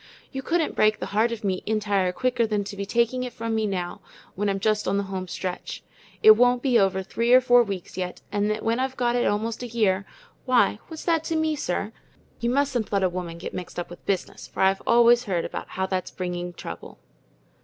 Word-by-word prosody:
You 270 - -4
couldn't 330 +3 0
break 215 0 +3
the - - -4
heart 220 +3 +3
of 230 -2 -5
me 190 -2 -1
entire 205 -4 +1
quicker 240 +3 0
than 210 -2 0
to 200 - -7
be 200 0 -5
taking 235 +3 +1
it 250 -1 -4
from 230 0 -3
me 220 -1 +1
now, 180 -3 -3 0.3
when 205 +2 -1
I'm 195 0 -1
just 215 +1 +1
on 195 - +1
the 200 - 0
home 190 -1 -5
stretch. 180 0 -5 0.4
It 435 - +11
won't 245 - +4
be 250 -4 +4
over 190 -1 +1
three 230 +5 -1
or 255 - +9
four 245 -1 +5
weeks 195 -6 -5
yet, 180 -1 -4
and 205 +1 +1
when 230 +2 0
I've 265 0 -2
gone 240 -1 +1
it 245 - +2
almost 220 +3 -1
a 245 - -4
year, 200 -5 +1 0.4
why, 240 -5 +3
what's 320 -1 -9
that 330 -2 +2
to 325 - -1
me, 315 -1 +1
sir? 210 -5 -2 0.5
You 235 - 0
mustn't 265 -3 0
let 200 -2 +1
a 185 - +3
woman 175 -2 -5
get 170 - -7
mixed 180 - -7
up 175 0 -4
with 175 - -11
business, 195 -2 -2
for - - -5
I've 195 0 +3
always 240 +1 +5
heard 180 -5 -1
about - - -5
how 190 0 -2
it's 185 -1 -1
bringing 180 -1 -4
trouble." 85 - -9
215 Hz, 225 wpm, -25 LUFS, 190-245 Hz, 0.5 s, It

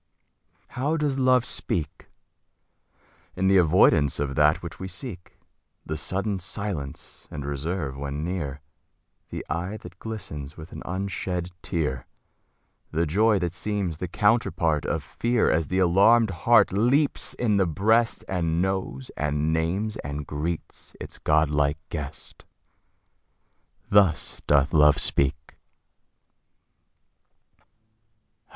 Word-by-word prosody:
How 145 +6 -1
does 145 -3 0
Love 130 -2 +4
speak? 80 -4 -2 1.3
In 95 - -1
the 95 0 +5
avoidance 80 -4 +4
of 70 -1 -1
that 75 +3 +3
which 85 -4 -8
we 95 - -5
seek 95 -4 -7 0.5
The 80 - -3
sudden 95 +6 -2
silence 90 -7 -6
and 75 -2 -6
reserve 70 0 -3
when 70 +2 -4
near 75 -5 -4 0.7
The - - -6
eye 90 +5 -3
that 90 -2 -13
glistens 75 -10 -6
with 80 +2 -10
an - - -8
unshed 90 -1 -3
tear 65 -7 -2 0.8
The 85 +2 0
joy 105 +7 +3
that 90 -3 -2
seems 95 -3 -3
the 90 - -3
counterpart 85 -7 +1
of - - -1
fear, 120 -1 +1
As 80 -1 +1
the 95 - -1
alarmed 100 +5 +5
heart 115 +4 +4
leaps 130 +8 +2
in 110 -4 +1
the 95 -2 +3
breast, 110 +8 +2
And 85 -3 0
knows 95 -9 -2
and 75 +1 0
names 95 +7 -1
and 75 0 -5
greets 80 +4 -5
its - - -8
godlike 75 -1 +2
guest 75 -4 -7 1.5
Thus 100 -6 +3
doth 70 0 +3
Love 75 -2 +6
speak. 70 +2 0
85 Hz, 120 wpm, -25 LUFS, 75-100 Hz, 1.5 s, Love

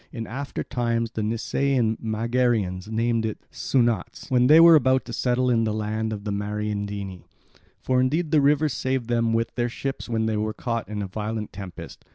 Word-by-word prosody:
In 115 -2 -5
after 135 +5 -5
times 115 -2 -1
the 110 - -3
Nisaean 115 +2 0
Megarians 110 -4 0
named 115 +1 0
it 110 -1 -4
Soonautes 120 -6 -1
when 125 -1 +4
they 155 +3 +8
were 170 0 +9
about 130 -3 +4
to 120 - -7
settle 125 +2 +1
in 115 -1 +3
the 110 -1 -1
land 110 +1 -2
of 105 -2 -5
the 105 - -3
Mariandyni. 100 -2 -3 0.6
For 130 -1 +1
indeed 155 +5 0
the 155 -3 +5
river 145 +2 +3
saved 130 -3 -2
them 115 -1 +1
with 115 0 0
their 120 -1 -1
ships 135 +1 -5
when 110 -1 0
they 110 -1 0
were 110 0 -2
caught 115 -4 -3
in 105 -1 -3
a - - -4
violent 105 +2 -4
tempest. 95 -3 -9
115 Hz, 190 wpm, -24 LUFS, 105-125 Hz, 0.6 s, were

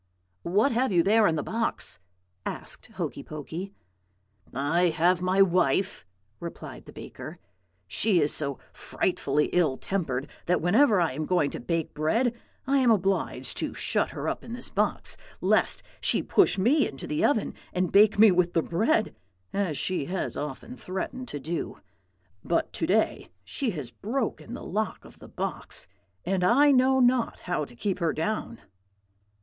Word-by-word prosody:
"'What 205 +10 +2
have 245 +1 +1
you 175 -2 +4
there 215 +2 +4
in 160 - +1
the 150 - -2
box?' 230 0 -1 0.4
asked - - -6
Hokey - - -4
Pokey. 160 +6 -7 0.8
"'I 160 +7 +2
have 175 +3 +2
my 185 +2 +4
wife,' 180 - +1 0.3
replied 170 -1 -8
the - - -11
baker. - - -9 0.5
'She 195 - +2
is 150 -1 +2
so 140 -3 -2 0.2
frightfully 150 -5 -1
ill 155 -7 +2
tempered 145 -9 -2 0.2
that 180 - +3
whenever 210 - +4
I 170 -4 +2
am 150 +4 -4
going 175 -6 +2
to - - -5
bake 165 +6 -2
bread 225 +11 +1 0.3
I 275 +1 +3
am 255 -2 +4
obliged 195 -3 0
to - - -2
shut - - 0
her - - -5
up - - -2
in 230 - -8
this 240 0 -5
box, - - 0 0.2
lest - - +2 0.2
she - - +2
push 390 - +3
me 270 +10 +3
into 135 - -7
the 150 - -1
oven 230 -7 +2 0.2
and 180 -1 -1
bake 205 +1 +6
me 215 0 +8
with 175 -1 +2
the 165 - +2
bread, 220 - +1 0.4
as 190 -8 -1
she 185 -6 -1
has 185 +4 -3
often 150 - -6
threatened 250 +6 -5
to 145 - -5
do. 165 +5 -4 0.6
But - - 0
to - - -1
day - - +1
she 270 -4 -2
has 130 -5 -5
broken 230 - -3
the - - -8
lock 215 +3 -3
of - - -16
the - - -12
box, - - -3 0.4
and 190 -1 0
I 280 +9 +5
know 265 0 +4
not 245 -1 +2
how 175 -4 -2
to 125 - -15
keep 190 - -2
her 165 -3 +1
down.' 215 +7 -2
185 Hz, 165 wpm, -27 LUFS, 160-225 Hz, 0.8 s, me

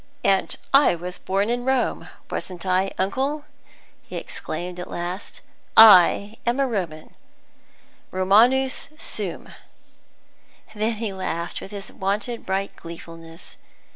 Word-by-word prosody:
"And 195 -1 +2 0.2
I 275 -9 +6
was 180 +2 -7
born 195 +4 0
in 245 0 -1
Rome, 265 -1 0 0.2
wasn't 180 -1 -5
I, 185 +1 +1
uncle?" 270 +10 -1 0.6
he - - -11
exclaimed 180 0 -5
at 180 - -6
last. 175 +3 -6 0.4
"I 210 0 +8
am 240 +3 0
a 275 - +3
Roman; 175 -10 -4 1.0
Romanus 240 +10 +3
sum!" - - -4 1.2
Then 220 +2 0
he 215 -2 -4
laughed 175 -3 -4
with - - -8
his 200 -1 -8
wonted 205 +5 -3
bright 195 +1 -2
gleefulness. 165 0 -11
195 Hz, 115 wpm, -23 LUFS, 180-235 Hz, 1.2 s, I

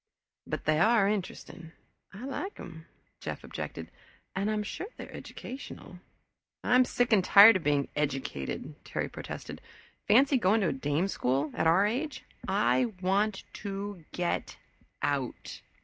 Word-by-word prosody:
"But - - -4
they 155 0 +3
are 220 +1 +5
interesting 180 -4 -4 0.4
I 210 +7 -8
like 360 +9 -4
them," 165 -3 -10 0.3
Jeff - - -6
objected, - - -6 0.4
"and 195 +2 0
I'm 215 -1 0
sure 370 - -5
they - - -7
are - - -14
educational." 250 -8 -9 0.6
"I'm 250 +1 +5
sick 245 -1 +1
and 195 -4 +5
tired 200 +3 +9
of 180 - -9
being 145 -2 +2
educated," 135 - -3
Terry - - -3
protested. - - -7 0.5
"Fancy 265 +6 +5
going 215 +2 +3
to 185 - +2
a - - -1
dame 145 +6 0
school 140 -4 0
at - - +1
our 180 +5 +5
age. 265 +8 -2 0.2
I 255 - +3
want 195 +2 +1
to 200 -3 -5
Get 175 -1 -2 0.5
Out!" 135 -4 -2
195 Hz, 145 wpm, -29 LUFS, 160-220 Hz, 0.6 s, tired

